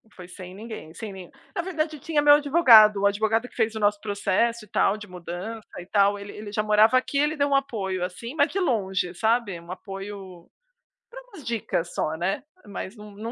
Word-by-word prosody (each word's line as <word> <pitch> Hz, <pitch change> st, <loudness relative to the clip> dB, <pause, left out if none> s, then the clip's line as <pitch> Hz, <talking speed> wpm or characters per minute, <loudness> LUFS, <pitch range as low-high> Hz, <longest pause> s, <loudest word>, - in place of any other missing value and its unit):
foi 180 Hz, -1 st, -11 dB
sem 185 Hz, 0 st, -10 dB
ninguém, 215 Hz, -7 st, -9 dB
sem 220 Hz, -2 st, -7 dB
nem 185 Hz, -2 st, -10 dB, 0.3 s
na 350 Hz, -, 0 dB
verdade 315 Hz, -4 st, -3 dB
tinha 295 Hz, +1 st, 0 dB
meu 290 Hz, 0 st, +8 dB
advogado, 245 Hz, -9 st, +6 dB
o -, -, +2 dB
advogado 220 Hz, +4 st, +1 dB
que -, -, -23 dB
fez 225 Hz, -2 st, 0 dB
o -, -, -3 dB
nosso 205 Hz, 0 st, +2 dB
processo, 215 Hz, +3 st, 0 dB
e -, -, -24 dB
tal, 195 Hz, +1 st, +2 dB
de 210 Hz, -, -10 dB
mudança 180 Hz, +5 st, -7 dB
e 175 Hz, -, -9 dB
tal, 200 Hz, +1 st, +3 dB
ele 200 Hz, 0 st, -8 dB
ele 210 Hz, -1 st, -8 dB
já 215 Hz, -, 0 dB
morava 215 Hz, +4 st, +5 dB
aqui, 270 Hz, +2 st, -1 dB
ele 295 Hz, +2 st, +2 dB
deu 285 Hz, 0 st, +1 dB
um 275 Hz, -, +3 dB
apoio, 195 Hz, -9 st, -1 dB
assim, 190 Hz, +8 st, -6 dB
mas 290 Hz, -1 st, +3 dB
de 390 Hz, -, -1 dB
longe, 190 Hz, -, 0 dB
sabe. 220 Hz, -2 st, 0 dB
Um 170 Hz, +1 st, -11 dB
apoio 195 Hz, -2 st, -9 dB, 0.6 s
pra -, -, -10 dB
umas 400 Hz, -, -14 dB
dicas 205 Hz, -7 st, -2 dB
só, 155 Hz, -, -1 dB
né. 190 Hz, +9 st, -2 dB, 0.2 s
Mas 200 Hz, 0 st, -7 dB
não 210 Hz, -1 st, -12 dB
não 215 Hz, +3 st, -7 dB
210 Hz, 210 wpm, -25 LUFS, 190-250 Hz, 0.6 s, meu